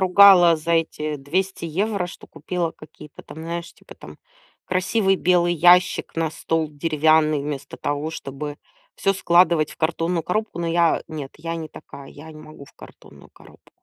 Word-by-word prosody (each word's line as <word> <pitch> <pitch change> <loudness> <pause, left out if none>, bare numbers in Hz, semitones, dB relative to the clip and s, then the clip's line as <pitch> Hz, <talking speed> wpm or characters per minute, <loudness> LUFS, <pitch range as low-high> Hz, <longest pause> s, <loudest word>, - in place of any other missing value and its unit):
ругала 185 -3 +7
за 165 +2 -3
эти 155 -2 -1
200 170 +6 -3
евро, 195 +3 -2
что - - -12
купила 170 +2 -4
какие-то 155 -1 -14
там, - - -12
знаешь, 170 +1 -6
типа - - -16
там - - -13 0.5
красивый 195 +1 +1
белый 175 -1 +2
ящик 175 +2 +3
на 165 -1 0
стол, 160 0 -2
деревянный, 155 0 +2
вместо 140 -1 -6
того, 145 +2 -3
чтобы 145 -1 -7 0.4
всё 195 - +1
складывать 170 -4 +3
в - - -13
картонную 165 +1 -1
коробку. 215 +3 -3
Но 170 - -2
я 170 0 +2
нет, 145 -4 -7
я 165 +2 -5
не 160 -1 -6
такая, 140 -2 -12
я 155 +2 -12
не 155 - -13
могу 155 -2 -13
в - - -20
картонную - - -16
коробку. - - -20
165 Hz, 165 wpm, -22 LUFS, 155-180 Hz, 0.5 s, ругала